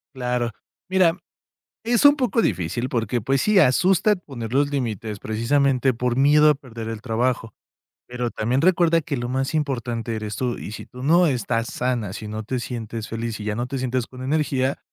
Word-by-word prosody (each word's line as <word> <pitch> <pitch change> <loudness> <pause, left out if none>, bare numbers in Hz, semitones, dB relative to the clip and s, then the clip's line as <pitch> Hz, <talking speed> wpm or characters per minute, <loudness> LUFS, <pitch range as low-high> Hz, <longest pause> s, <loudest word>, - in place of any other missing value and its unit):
Claro. 125 -2 -1 0.4
Mira, 185 -2 +3 0.7
es 235 +2 +2
un 285 0 +8
poco 250 -4 +1
difícil 120 - -1
porque 115 0 -1
pues 135 +4 +1
sí, 210 -2 +4
asusta 185 +8 +4
poner 130 - -8
los 140 +1 +2
límites 110 -6 -3
precisamente 130 +4 +1
por 120 +1 -1
miedo 150 +2 +6
a - - +6
perder 115 -5 -8
el 115 -1 -5
trabajo. 115 0 -1 0.5
Pero 125 -1 -3
también 120 +5 0
recuerda 170 -1 +4
que 145 -2 -3
lo 120 0 -3
más 135 +3 -1
importante 120 -6 -2
eres 105 -1 -4
tú. 125 +2 -2
Y - - -7
si 110 - -8
tú 125 0 -10
no 170 +5 +5
estás 115 -3 -1
sana, 120 -6 -2
si 105 - -7
no 110 +1 -4
te 125 +3 -3
sientes 115 -2 -5
feliz 115 -1 -4
y 105 - -6
ya 105 0 -2
no 120 +1 -2
te 135 - -4
sientes 125 -1 -1
con 130 0 -10
energía. 135 -2 0
125 Hz, 190 wpm, -23 LUFS, 115-145 Hz, 0.7 s, un